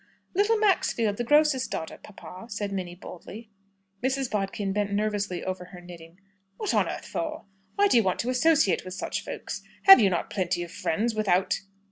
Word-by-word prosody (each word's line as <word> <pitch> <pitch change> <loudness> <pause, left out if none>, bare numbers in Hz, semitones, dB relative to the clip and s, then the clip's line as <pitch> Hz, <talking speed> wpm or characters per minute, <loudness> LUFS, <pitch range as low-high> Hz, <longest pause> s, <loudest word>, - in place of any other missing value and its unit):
"Little 410 +4 +3
Maxfield, 240 - +1
the 240 - -1
grocer's 295 0 +3
daughter, 160 - -5
papa," 195 0 -11
said 205 -1 -4
Minnie, 180 -3 -4
boldly. 205 +5 -11 0.5
Mrs. 265 0 -1
Bodkin 195 -1 -2
bent 205 0 -1
nervously 200 -3 -1
over 185 -1 -4
her 180 0 -12
knitting. 175 -1 -13 0.4
"What 425 - -2
on - - +2
earth - - -6
for? 310 -7 -4 0.3
Why 405 0 +4
do 255 - +4
you - - +6
want 185 -2 0
to 245 - -2
associate 265 - +3
with 185 0 -7
such - - -4
folks? - - -6 0.2
Have 390 0 +10
you 200 - +4
not 175 - -2
plenty 180 -2 -1
of 170 - -9
friends 220 +6 -1
without 195 -4 +1
205 Hz, 180 wpm, -26 LUFS, 185-260 Hz, 0.5 s, Have